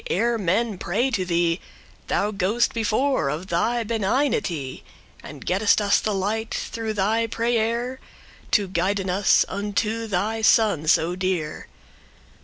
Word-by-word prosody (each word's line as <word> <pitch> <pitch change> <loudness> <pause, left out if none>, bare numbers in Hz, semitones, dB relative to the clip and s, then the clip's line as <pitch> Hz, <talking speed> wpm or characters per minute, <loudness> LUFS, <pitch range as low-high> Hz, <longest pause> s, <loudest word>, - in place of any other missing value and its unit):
ere 235 +6 +1
men 200 +2 0
pray 235 +9 0
to 200 -6 0
thee, 170 0 +1 0.5
Thou 205 +1 0
go'st 205 +4 +1
before, 230 - +1
of 160 +7 -5
thy 230 +8 +1
benignity, 210 - -1 0.4
And - - -10
gettest 200 +4 +3
us 205 -1 +3
the 215 - -2
light, 210 +3 -2
through 225 -1 -3
thy 215 +3 +1
prayere, 235 +2 -1 0.5
To 205 -2 +2
guiden 185 +1 -1
us 195 +2 +4
unto 210 +3 -2
thy 215 +3 -1
son 210 -8 +3
so 170 +2 +3
dear. 185 -5 -2
205 Hz, 130 wpm, -23 LUFS, 185-225 Hz, 0.5 s, us